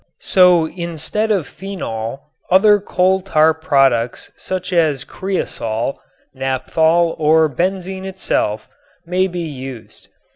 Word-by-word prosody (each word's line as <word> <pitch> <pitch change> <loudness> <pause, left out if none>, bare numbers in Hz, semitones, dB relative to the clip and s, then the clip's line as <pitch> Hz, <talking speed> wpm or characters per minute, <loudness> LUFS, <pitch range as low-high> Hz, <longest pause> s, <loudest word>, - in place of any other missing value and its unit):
So 180 -4 +5
instead 170 +5 -3
of 195 -7 +1
phenol, 135 - -6 0.3
other 205 +3 +5
coal 190 -1 +1
tar 160 -4 +3
products 135 -7 +1
such 185 0 -5
as 155 -6 +1
cresol, 130 - -3 0.4
naphthol 160 +6 +1
or 160 +1 +4
benzene 190 +5 -3
itself 145 - -2 0.4
may 180 +2 +1
be 175 -1 -5
used. 130 -5 -8
165 Hz, 105 wpm, -18 LUFS, 135-185 Hz, 0.4 s, So